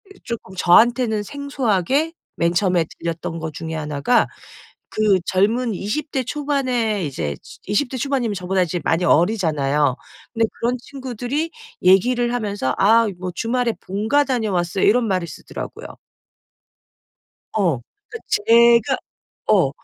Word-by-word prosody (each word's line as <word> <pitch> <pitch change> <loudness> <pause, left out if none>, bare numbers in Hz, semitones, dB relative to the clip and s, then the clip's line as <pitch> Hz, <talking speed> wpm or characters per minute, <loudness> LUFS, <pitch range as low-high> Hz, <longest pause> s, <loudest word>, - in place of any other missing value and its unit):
이 - - -20
쪼끔 225 -5 -6
저한테는 220 +4 +4
생소하게 275 - -1 0.2
맨 170 +1 +1
처음에 180 -2 +2
들렸던 165 0 -4
거 160 0 -4
중에 160 +2 -6
하나가 150 - +1 0.6
그 210 -3 +2
젊은 220 +5 +1
20 245 - -3
대 265 - 0
초반에 255 -7 -1
이제 75 - -3
즈 - - -14
20 210 +7 0
대 260 - -5
초반이면 255 -5 -1
저보다 185 0 0
이제 175 0 -1
많이 165 +2 +1
어리잖아요. 150 - +2 0.4
근데 230 -1 +2
그런 245 +2 0
친구들이 260 +4 -4 0.3
얘기를 240 +6 +4
하면서 205 - -1
"아 225 +3 +5
이 - - -7
뭐 180 0 -4
주말에 235 +4 0
본가 220 +9 +1
다녀왔어요." 200 -8 0
이런 230 +3 +3
말을 185 -4 0
쓰더라고요. - - -8 1.6
어 180 - +1 0.3
그러니까 450 - -7
제가 235 - +4 0.5
어 - - +4
215 Hz, 285 characters per minute, -21 LUFS, 180-250 Hz, 1.6 s, 아